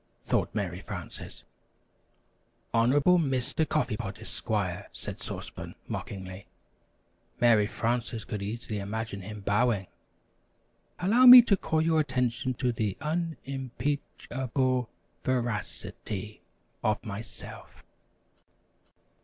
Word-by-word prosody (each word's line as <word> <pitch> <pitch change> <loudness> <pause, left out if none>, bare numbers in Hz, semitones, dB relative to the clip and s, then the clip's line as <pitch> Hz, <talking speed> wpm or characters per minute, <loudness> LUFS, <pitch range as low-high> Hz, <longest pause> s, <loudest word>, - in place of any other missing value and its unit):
thought - - 0
Mary 90 -4 -2
Frances.) 95 -4 -8 1.3
"Honorable 140 +10 +4
Mr. 135 +1 0
Coffee 150 -8 0
Pot, 100 -4 -5
Esquire," - - -3
said - - -8
Sauce - - -6
Pan, - - -8
mockingly. 95 -1 -6 0.9
(Mary 115 -4 +5
Frances 115 0 -2
could 105 - -4
easily 105 +1 -4
imagine 100 0 -4
him 105 +2 -8
bowing.) 105 0 +2 1.1
"Allow 230 +8 +5
me 250 0 +13
to 210 - +3
call 160 -4 0
your 160 -1 +3
attention 125 -3 0
to 125 -1 0
the 105 -4 -2
un 160 +2 -2
im 135 -1 -4
peach 140 +3 -3
able 130 -2 0 0.3
ver 125 -2 +1
ac 105 -3 -4
i - - -11
ty 105 +1 -5 0.4
of 110 +2 0
myself." 110 +2 -9
120 Hz, 115 wpm, -29 LUFS, 105-140 Hz, 1.3 s, me